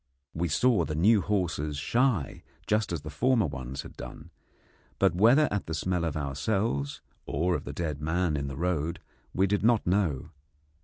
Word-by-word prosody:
We 85 +2 -1
saw 105 - +3
the 75 - -3
new 100 +6 +4
horses 85 -7 -1
shy 115 - 0 0.2
just 105 -2 +1
as 85 -4 -2
the 75 - -7
former 120 - +2
ones 65 -2 -5
had - - -12
done, - - -9 0.7
but - - +3
whether 120 - +5
at 105 - -2
the 80 - -2
smell 90 +2 -1
of 80 -2 -2
ourselves 70 +1 -1 0.3
or 85 +6 0
of - - -3
the - - -5
dead 75 -4 -3
man 80 +1 0
in 70 -1 -2
the 70 -1 -6
road 85 -2 -1 0.3
we 95 - +2
did 100 +1 +1
not 115 -1 +3
know. 90 -7 0
85 Hz, 175 wpm, -28 LUFS, 75-105 Hz, 0.7 s, whether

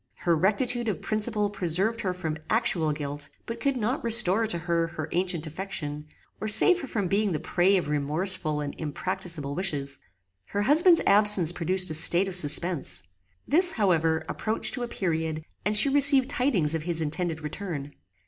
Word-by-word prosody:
Her 170 -1 -1
rectitude 225 +7 0
of 195 - -4
principle 215 -1 -2
preserved 195 +5 -1
her 190 - -2
from 165 -4 -5
actual 175 -9 +1
guilt, 145 -1 -7 0.2
but 230 0 -7
could 275 0 -1
not 245 +5 -3
restore 225 -2 +3
to 190 - -1
her 170 0 -2
her 160 -2 -7
ancient 175 -2 -1
affection, 155 -3 -6 0.3
or 215 - -5
save 350 - +6
her 275 - -7
from 205 -6 -3
being 200 +1 -1
the 155 - -3
prey 185 +6 +1
of 180 - -3
remorseful 150 +2 0
and 145 -1 -6
impracticable 155 -1 -4
wishes. 145 -6 -4 0.5
Her 205 - -3
husband's 330 - +4
absence 200 -4 +4
produced 180 +1 -1
a - - -3
state 170 +4 +5
of 190 - -6
suspense. 165 - +2 0.4
This, 350 +4 +4
however, 165 -6 0
approached 220 +1 -1
to 250 - -3
a 240 - -3
period, 160 -6 -4 0.2
and 210 +1 +3
she 215 - +6
received 280 -1 +4
tidings 200 - -1
of 160 - -3
his 165 0 -3
intended 160 +1 -3
return. 150 -3 -7
180 Hz, 170 wpm, -25 LUFS, 160-215 Hz, 0.5 s, save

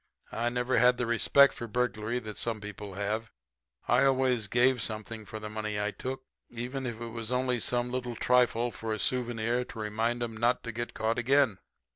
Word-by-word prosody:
I 120 +1 0
never 125 0 +1
had 125 +1 +5
the 125 - 0
respect 125 +4 +5
for 120 - -6
burglary 115 0 -1
that 110 -4 -6
some 115 -2 -2
people 105 -1 -8
have. 105 +3 -2 0.6
I 125 +2 +4
always 130 -5 +2
gave 125 +3 +3
something 110 0 -3
for 110 +2 -7
the 105 - -6
money 105 -1 -3
I 105 0 0
took, 130 +4 -5 0.3
even 125 +3 -4
if 115 -2 -5
it 120 0 -5
was 115 0 -5
only 125 -1 +1
some 120 +2 0
little 125 -1 -3
trifle 120 -1 +2
for 110 -1 -3
a - - -5
souvenir 120 +1 0
to - - -11
remind 115 +3 -1
'em 115 -1 -4
not 120 +2 +1
to 115 - -4
get 120 +2 -5
caught 115 +2 0
again. 130 -4 +3
120 Hz, 195 wpm, -29 LUFS, 110-125 Hz, 0.6 s, had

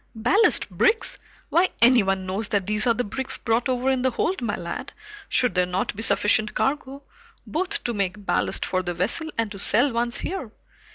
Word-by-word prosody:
"Ballast 370 - +3
bricks? 455 -1 +1 0.3
Why, 360 +2 +3
anyone 205 -6 +4
knows 195 +3 -2
that 200 -3 -1
these 210 +3 0
are 235 - +5
the 245 - -1
bricks 265 +5 -1
brought 230 +3 0
over 255 +1 +1
in 260 -1 0
the 260 - +2
hold, 335 +8 -2
my 225 -4 -1
lad, 170 0 -6 0.4
should 250 -5 +1
there 180 -1 +1
not 180 +2 -2
be 215 - -6
sufficient 215 -1 +1
cargo, 275 0 -2 0.4
both 375 +6 -2
to 240 - -1
make 200 0 -3
ballast - - 0
for 185 - -1
the 175 -1 -4
vessel 235 - -1
and 225 -2 -1
to 200 - -8
sell 245 +7 +4
once 235 +1 0
here. 355 - -5
235 Hz, 190 wpm, -24 LUFS, 200-265 Hz, 0.4 s, are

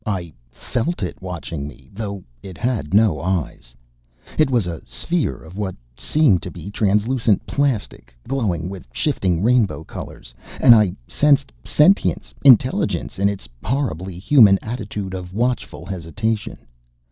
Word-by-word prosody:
I 90 -6 -3 0.2
felt 125 - -3
it 90 - -5
watching 85 -5 -5
me 70 -2 -14
though 100 -2 -5 0.2
it 95 -3 -10
had 115 - -2
no 105 -6 +3
eyes! 85 -9 -3 0.6
It 155 -3 +4
was 120 -7 +2
a 85 -3 -5
sphere 175 -2 -2
of 90 +5 -11
what 95 -3 -3 0.2
seemed 120 - +2
to - - -6
be 100 - -9
translucent 105 +2 +1
plastic, 115 - -2
glowing 105 - -1
with 95 -1 -8
shifting 95 - 0
rainbow 115 -8 +2
colors. - - -9 0.3
And 125 - +8
I 105 -5 +4
sensed 140 -2 +2
sentience 185 +7 +2
intelligence 130 -6 +3
in 100 +1 +3
its 100 -2 -6 0.2
horribly 95 - -2
human 100 -1 +6
attitude 105 -4 -5
of 90 0 -7
watchful 120 -7 -2
hesitation. 100 +4 -3
100 Hz, 135 wpm, -21 LUFS, 90-125 Hz, 0.6 s, And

